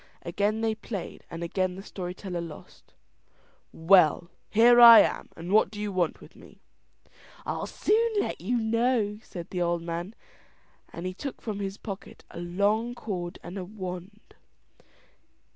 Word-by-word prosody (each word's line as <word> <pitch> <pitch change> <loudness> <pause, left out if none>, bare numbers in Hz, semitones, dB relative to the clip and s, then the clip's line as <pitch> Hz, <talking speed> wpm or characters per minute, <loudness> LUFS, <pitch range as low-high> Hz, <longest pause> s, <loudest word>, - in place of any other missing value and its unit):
Again 205 +5 -1
they 225 -1 +1
played, 215 -3 -7
and 170 0 -6
again 185 +1 -1
the 195 - -9
story 180 -3 -6
teller 180 -3 -5
lost. 165 -3 -12 0.8
"Well! 170 -1 +4 0.2
here 240 +2 +6
I 235 -1 +12
am, - - -1
and 170 +3 -7
what 215 -2 +4
do 210 0 -9
you 210 -1 -3
want 180 -4 -1
with - - -15
me?" - - -17 0.9
"I'll - - -3
soon 455 +2 +1
let - - -3
you 240 +7 0
know," 225 -2 0
said 175 -5 -9
the 180 - -2
old 170 -1 0
man, 170 +5 -5 0.8
and 170 - -7
he 185 - -3
took 275 +8 -7
from 210 -3 -5
his 195 0 -4
pocket 200 -3 -9
a - - -8
long 205 +7 0
cord 180 -7 -5
and 185 +3 -7
a - - -4
wand. 185 +1 -8
195 Hz, 160 wpm, -27 LUFS, 175-220 Hz, 0.9 s, I